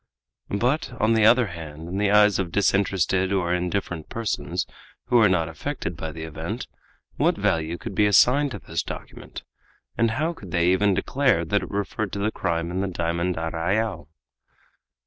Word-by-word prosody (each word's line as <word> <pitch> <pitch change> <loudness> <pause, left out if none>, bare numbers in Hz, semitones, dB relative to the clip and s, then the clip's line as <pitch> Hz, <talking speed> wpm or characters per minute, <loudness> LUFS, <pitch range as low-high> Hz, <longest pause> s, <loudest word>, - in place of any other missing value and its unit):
But, 125 +10 -1
on 110 +2 +3
the 110 -1 +4
other 120 +2 +6
hand, 80 -4 -8
in 95 +3 -3
the 105 -1 +2
eyes 105 -1 +5
of 90 -3 -2
disinterested 95 -1 +1
or 90 -3 +1
indifferent 90 -2 -2
persons 115 -2 -2 0.4
who 120 - +3
were 110 -3 +6
not 85 -3 +1
affected 85 - -4
by 80 0 -5
the 80 +1 -7
event, 80 -1 -5 0.5
what - - +2
value 80 +1 0
could - - -7
be 105 +2 +3
assigned 130 +8 +5
to - - -6
this 80 0 -3
document? - - -9 0.6
and 115 0 +4
how 155 +9 -1
could 100 - -12
they 85 +1 +2
even 100 +1 +3
declare 130 -11 +1
that 100 +4 +1
it - - -7
referred 100 +1 -3
to 100 - -3
the 105 +2 0
crime 85 -3 -2
in 95 +1 -1
the 100 - -1
diamond 85 0 -1
arrayal? 85 +7 -1
95 Hz, 175 wpm, -24 LUFS, 85-110 Hz, 0.6 s, other